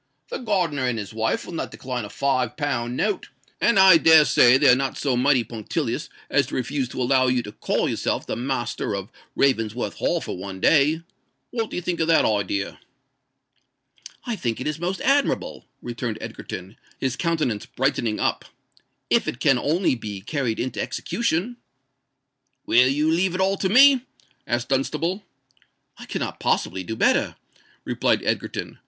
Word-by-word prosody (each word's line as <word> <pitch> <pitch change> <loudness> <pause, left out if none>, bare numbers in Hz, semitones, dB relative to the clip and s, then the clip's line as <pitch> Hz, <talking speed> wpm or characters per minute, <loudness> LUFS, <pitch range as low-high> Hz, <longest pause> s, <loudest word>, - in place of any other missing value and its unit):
"The 485 - -4
gardener 175 - 0
and 125 -2 -1
his 105 -1 -6
wife 110 0 -1
will - - -9
not 165 - -3
decline 125 -3 -5
a - - -9
five 130 -3 -1
pound 125 -5 -2
note; 210 -3 -1 0.3
and 235 - +3
I 190 -3 +8
dare 160 -1 +7
say 125 -1 +6
they 145 +1 +3
are 125 - +7
not 135 0 -2
so 135 -3 0
mighty 130 0 +3
punctilious 110 -1 -4 0.2
as - - +2
to - - -6
refuse 130 0 -2
to 130 - -5
allow 130 +1 +3
you 125 -1 +1
to 105 - -8
call - - -1
yourself - - -2
the - - -3
master 120 -4 -2
of 100 0 -6 0.2
Ravensworth 120 -4 0
Hall - - 0
for - - -5
one 95 +1 -7
day. 155 - +3 0.5
What 225 -3 -2
do - - -7
you 180 - -3
think 175 0 -2
of 160 - +1
that 165 -1 +4
idea?" 100 -1 -1 1.5
"I 240 - -2
think 120 - -3
it 130 - -5
is 150 +1 -2
most 180 +3 -3
admirable," 280 +1 0 0.2
returned 120 -2 -4
Egerton, 95 +4 -8 0.2
his 130 -2 -2
countenance 155 -11 -1
brightening 120 -5 -1
up—"if - - -3
it 120 - -3
can 135 -3 +3
only 165 +6 +1
be 105 -5 -6
carried 120 0 -2
into 130 - -2
execution." 235 +1 -2 1.1
"Will 125 +2 +5
you 150 +3 +1
leave 180 +2 +1
it - - -3
all 195 +1 +2
to 190 - 0
me?" 265 +4 +7 0.5
asked 120 +1 -1
Dunstable. 155 +8 -1 0.8
"I - - -10
cannot - - -4
possibly 95 +1 0
do 110 +5 -5
better," - - +2 0.5
replied - - +1
Egerton. - - -3
135 Hz, 170 wpm, -23 LUFS, 120-165 Hz, 1.5 s, I